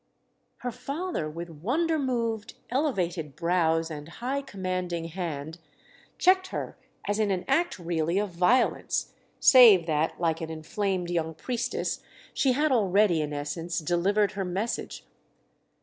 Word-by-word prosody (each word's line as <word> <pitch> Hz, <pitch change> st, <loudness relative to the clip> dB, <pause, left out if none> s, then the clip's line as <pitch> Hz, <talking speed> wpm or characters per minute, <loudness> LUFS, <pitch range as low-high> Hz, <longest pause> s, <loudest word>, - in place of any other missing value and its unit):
Her 250 Hz, -1 st, -2 dB
father, 275 Hz, -, -4 dB
with 170 Hz, +2 st, -7 dB
wonder 295 Hz, -, 0 dB
moved, 230 Hz, -5 st, -2 dB, 0.2 s
elevated 180 Hz, -, -1 dB
brows 165 Hz, -1 st, +1 dB
and 150 Hz, 0 st, -7 dB
high 255 Hz, +9 st, -3 dB
commanding 185 Hz, -7 st, -3 dB
hand, 160 Hz, -2 st, -5 dB, 0.6 s
checked 375 Hz, +1 st, +4 dB
her -, -, -5 dB, 0.3 s
as 205 Hz, +1 st, 0 dB
in 215 Hz, -1 st, +2 dB
an 185 Hz, -2 st, -1 dB
act 345 Hz, +1 st, +1 dB
really 170 Hz, 0 st, -1 dB
of 205 Hz, -1 st, 0 dB
violence—save 210 Hz, +1 st, +4 dB
that, 155 Hz, 0 st, 0 dB
like 165 Hz, -1 st, 0 dB
an 160 Hz, -, -4 dB
inflamed 175 Hz, +3 st, -2 dB
young 160 Hz, -2 st, -1 dB
priestess, 245 Hz, +8 st, -2 dB, 0.3 s
she 265 Hz, -2 st, +2 dB
had 295 Hz, +3 st, +1 dB
already, 200 Hz, -6 st, +3 dB
in 150 Hz, -1 st, -3 dB
essence, 150 Hz, +4 st, -4 dB
delivered 190 Hz, +6 st, +1 dB
her 200 Hz, -1 st, -3 dB
message. 190 Hz, +6 st, -3 dB
185 Hz, 130 wpm, -27 LUFS, 165-235 Hz, 0.6 s, checked